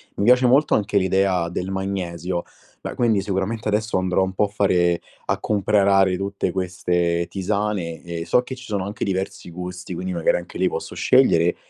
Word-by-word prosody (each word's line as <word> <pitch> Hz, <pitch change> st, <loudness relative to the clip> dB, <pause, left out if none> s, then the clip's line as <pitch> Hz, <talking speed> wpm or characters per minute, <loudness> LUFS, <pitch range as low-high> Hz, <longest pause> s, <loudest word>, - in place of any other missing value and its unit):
Mi -, -, -1 dB
piace 125 Hz, +3 st, +5 dB
molto 135 Hz, +5 st, +4 dB
anche 105 Hz, 0 st, 0 dB
l'idea 95 Hz, -2 st, +1 dB
del 90 Hz, +2 st, -4 dB
magnesio, 90 Hz, -2 st, -3 dB, 0.4 s
beh -, -, -5 dB
quindi 110 Hz, -5 st, +2 dB
sicuramente 100 Hz, +3 st, -2 dB
adesso 105 Hz, -1 st, 0 dB
andrò 95 Hz, 0 st, +1 dB
un 95 Hz, 0 st, -3 dB
po' 100 Hz, -, +1 dB
a -, -, -3 dB
fare 90 Hz, -4 st, +1 dB, 0.2 s
a -, -, -1 dB
comprare 100 Hz, -2 st, +3 dB
tutte 100 Hz, -1 st, -2 dB
queste 90 Hz, -2 st, 0 dB
tisane, 95 Hz, -4 st, -2 dB
e 85 Hz, -1 st, -5 dB
so 125 Hz, -, +3 dB
che 130 Hz, +1 st, -6 dB
ci 130 Hz, 0 st, -12 dB
sono 100 Hz, -4 st, -2 dB
anche 100 Hz, -, -5 dB
diversi 95 Hz, -2 st, -3 dB
gusti, 90 Hz, +1 st, -7 dB
quindi 185 Hz, +1 st, -4 dB
magari -, -, +2 dB
anche -, -, -8 dB
lì -, -, +3 dB
posso 465 Hz, 0 st, -5 dB
scegliere, -, -, +4 dB
95 Hz, 180 wpm, -22 LUFS, 90-105 Hz, 0.4 s, piace